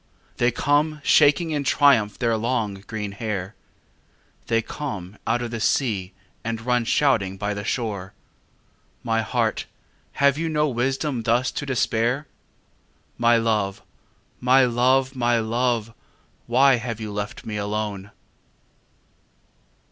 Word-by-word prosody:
They 120 - +3
come 145 +5 +1
shaking 155 +4 +4
in 145 -2 -1
triumph 135 -7 +3
their 115 -2 +1
long, 110 -2 -1
green 105 -2 -4
hair: 100 -2 -4 0.9
They 115 0 +1
come 110 - -6
out 120 - +1
of 120 - -5
the 115 - -4
sea 105 -6 0 0.3
and 115 -1 -3
run 120 0 +1
shouting 110 -9 +2
by 105 +1 -2
the 100 0 -5
shore. 100 -5 -3 0.9
My 115 0 +1
heart, 115 0 -1 0.5
have 140 +1 +3
you 165 0 -1
no 150 -1 +1
wisdom 135 +1 -1
thus 120 +3 +1
to 145 - -5
despair? 125 +1 0 0.9
My 120 0 +5
love, 105 -4 0 0.6
my 130 +1 +5
love, 130 +2 +2
my 120 -1 +2
love, 115 0 0 0.5
why 130 +2 +5
have 115 -2 -5
you 110 -1 -5
left 105 +3 -5
me 105 -1 -4
alone? 105 -1 -3
115 Hz, 125 wpm, -23 LUFS, 110-130 Hz, 0.9 s, My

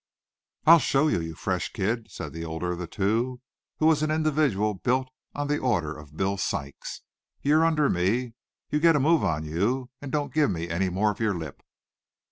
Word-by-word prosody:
"I'll 165 +1 +9
show 145 +1 +2
you, 85 - +1
you 80 0 -6
fresh - - -2
kid," 110 +4 -2
said - - -7
the 80 0 -5
older 80 +2 -3
of 90 - -4
the 90 - -4
two, 115 +8 0 0.4
who 155 - +1
was 160 -2 +4
an 155 - +1
individual 150 -9 +1
built 125 +7 0 0.3
on 145 - -2
the 145 0 0
order 85 -12 0
of 75 0 -13
"Bill 95 +1 0
Sykes." 70 -6 -4 0.4
"You're 155 +3 +4
under 155 -3 +3
me. 115 +7 0 0.4
You 150 - +2
get 165 0 +5
a - - +3
move 160 +3 +3
on 80 -2 0
you, 115 - -1
and 140 -2 -6
don't 145 0 -1
give 155 -1 +3
me 85 -3 -3
any 90 +3 0
more 100 +4 +1
of 105 - -10
your 110 -4 +1
lip." 80 -4 -7
115 Hz, 200 wpm, -26 LUFS, 90-145 Hz, 0.4 s, I'll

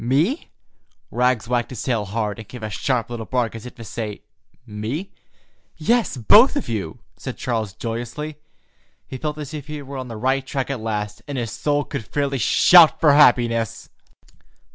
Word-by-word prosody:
"Me?" 155 - +1 0.6
Rags 125 -2 +1
wagged 120 -1 0
his 125 - -6
tail 115 -5 0
hard, 105 +1 -3
and 110 - -9
gave 125 -1 -10
a 110 - -4
sharp 120 0 -1
little 115 -2 -5
bark, 125 -3 0
as 115 +1 -8
if - - -11
to 115 - -10
say: 110 -1 -6 0.4
"Me?" 115 - -5 0.7
"Yes, 225 - +1
both 215 - +6
of 285 - -2
you," 100 -8 -4 0.2
said - - -6
Charles 110 -5 -2
joyously. 120 +8 -5 0.7
He 130 - -7
felt 150 +2 -3
as 150 0 -7
if 145 -2 -6
he 150 -1 -5
were 135 0 -7
on 130 -1 -5
the 115 -2 -7
right 130 +4 +1
track 135 0 -3
at 135 - -3
last, 105 -2 -3
and 140 -2 -4
his 115 -3 -3
soul 145 -1 0
could 140 -5 -5
fairly 140 +4 -2
shout 170 - +7
for 150 -3 +5
happiness. 120 -6 +3
125 Hz, 180 wpm, -22 LUFS, 115-145 Hz, 0.7 s, shout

